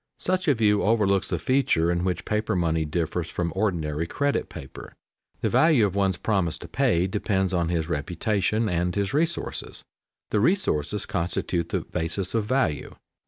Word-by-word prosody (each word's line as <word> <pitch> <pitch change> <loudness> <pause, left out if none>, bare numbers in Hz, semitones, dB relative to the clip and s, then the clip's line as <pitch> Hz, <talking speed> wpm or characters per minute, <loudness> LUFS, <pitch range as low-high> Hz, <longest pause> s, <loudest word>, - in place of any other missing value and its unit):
Such 185 -1 -1
a 145 - +5
view 105 -2 +3
overlooks 100 -3 +2
the 90 - 0
feature 85 - +2
in 85 0 0
which 90 -1 -2
paper 110 0 0
money 80 -2 +1
differs 85 +2 -2
from 85 -2 -2
ordinary 85 -6 -1
credit 140 +9 -1
paper. 65 - -10 0.5
The - - +1
value 155 -9 +4
of 100 - -1
one's 95 -2 +1
promise 95 -5 0
to - - -10
pay 85 +1 +2
depends 95 -1 0
on 85 -2 +1
his 85 -2 -1
reputation 95 +7 0
and 90 -1 0
his 100 +2 -1
resources; 165 +3 -2 0.5
the 105 - +2
resources 105 - +1
constitute 85 -1 -2
the - - -1
basis 90 +3 -3
of 115 -2 +1
value. 115 - 0
95 Hz, 165 wpm, -25 LUFS, 85-110 Hz, 0.5 s, a